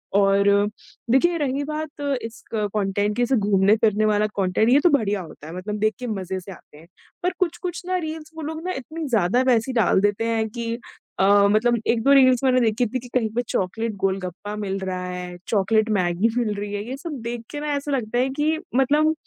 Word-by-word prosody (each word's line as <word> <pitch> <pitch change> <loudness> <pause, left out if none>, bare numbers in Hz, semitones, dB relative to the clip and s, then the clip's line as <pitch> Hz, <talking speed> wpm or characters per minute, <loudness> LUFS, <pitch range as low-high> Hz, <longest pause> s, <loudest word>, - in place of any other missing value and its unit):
और 200 0 +4 0.6
देखिए 340 +7 +3
रही 285 -2 -1
बात 305 0 -5 0.2
इस 225 0 -8
कंटेंट 205 -1 0
के 245 - +2
से 260 +2 +1
घूमने-फिरने 210 +1 +3
वाला 210 0 +2
कंटेंट 195 +3 +2
ये 265 +3 +6
तो 355 - +6
बढ़िया 210 - +1
होता 155 -3 -11
है 165 - -8
मतलब 210 +3 -4
देख 215 +1 +2
के 250 - -5
मज़े 190 -4 -3
से 185 +2 -10
आते 160 -4 -15
हैं। 160 +2 -16 0.4
पर 360 - +2
कुछ-कुछ 350 0 -2
ना 370 0 0
रील्स 315 -2 -6
वो 320 - -6
लोग 315 +1 -5
ना 370 - -1
इतनी 315 +5 -6
ज़्यादा 225 +1 +2
वैसे 240 0 +2
ही - - -6
डाल 220 -5 +3
देते 205 +2 +1
हैं 225 -1 0
कि 230 +1 -4 0.4
अ, 200 +1 +5
मतलब 235 +3 +3
1-2 235 +4 +3
रील्स 255 -2 +5
मैंने 255 -1 +4
देखी 225 +1 +2
थी 255 +3 -3
कि 250 - -11
कहीं 235 -4 +1
पे 245 - +2
चॉकलेट 220 +5 -1
गोलगप्पा 195 +1 -3
मिल 200 -2 -3
रहा 185 -1 -4
है, 180 -1 -6
चॉकलेट 215 +1 +2
मैगी 180 +4 +1
मिल 230 -4 +1
रही 205 0 -5
है 205 0 -3
ये 265 - -4
सब 325 +4 -7
देख 235 0 -4
के 295 - -5
ना 300 - -4
ऐसा 285 +1 -3
लगता 240 -4 -1
है 260 +2 +2
कि 310 +2 +2 0.2
मतलब 295 +4 +3
225 Hz, 210 wpm, -23 LUFS, 200-265 Hz, 0.6 s, ये